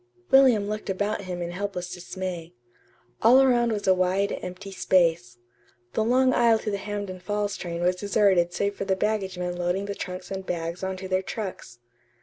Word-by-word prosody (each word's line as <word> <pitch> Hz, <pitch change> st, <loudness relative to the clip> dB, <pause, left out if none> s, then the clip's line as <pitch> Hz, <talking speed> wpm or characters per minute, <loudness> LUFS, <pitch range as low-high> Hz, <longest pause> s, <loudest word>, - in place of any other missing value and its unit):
William 255 Hz, -7 st, +6 dB
looked 215 Hz, 0 st, -4 dB
about 205 Hz, +1 st, -1 dB
him 180 Hz, -1 st, -4 dB
in 170 Hz, -, -4 dB
helpless 180 Hz, -1 st, -4 dB
dismay. 180 Hz, -1 st, -6 dB, 0.7 s
All 240 Hz, +4 st, +7 dB
around 240 Hz, -3 st, +4 dB
was 210 Hz, -2 st, -2 dB
a 190 Hz, -, +5 dB
wide, 185 Hz, +2 st, 0 dB
empty 185 Hz, +2 st, -7 dB
space. 165 Hz, -11 st, +1 dB, 0.6 s
The 220 Hz, -, +1 dB
long 255 Hz, +3 st, +3 dB
aisle 235 Hz, -2 st, +4 dB
to 215 Hz, -1 st, -4 dB
the 200 Hz, -, -1 dB
Hampden 205 Hz, -2 st, -5 dB
Falls 205 Hz, +2 st, -2 dB
train 170 Hz, -1 st, -4 dB
was 180 Hz, +1 st, +2 dB
deserted 195 Hz, -3 st, +2 dB
save 200 Hz, +3 st, -1 dB
for 200 Hz, -, -5 dB
the 190 Hz, -, +1 dB
baggage 195 Hz, -2 st, -1 dB
men 180 Hz, 0 st, -3 dB
loading 175 Hz, +3 st, -1 dB
the 200 Hz, -, -3 dB
trunks 185 Hz, -1 st, -7 dB
and 190 Hz, 0 st, -4 dB
bags 170 Hz, 0 st, -4 dB
on 190 Hz, 0 st, -2 dB
to 190 Hz, 0 st, -6 dB
their 185 Hz, 0 st, +1 dB
trucks. 190 Hz, -, -6 dB
190 Hz, 185 wpm, -26 LUFS, 180-205 Hz, 0.7 s, All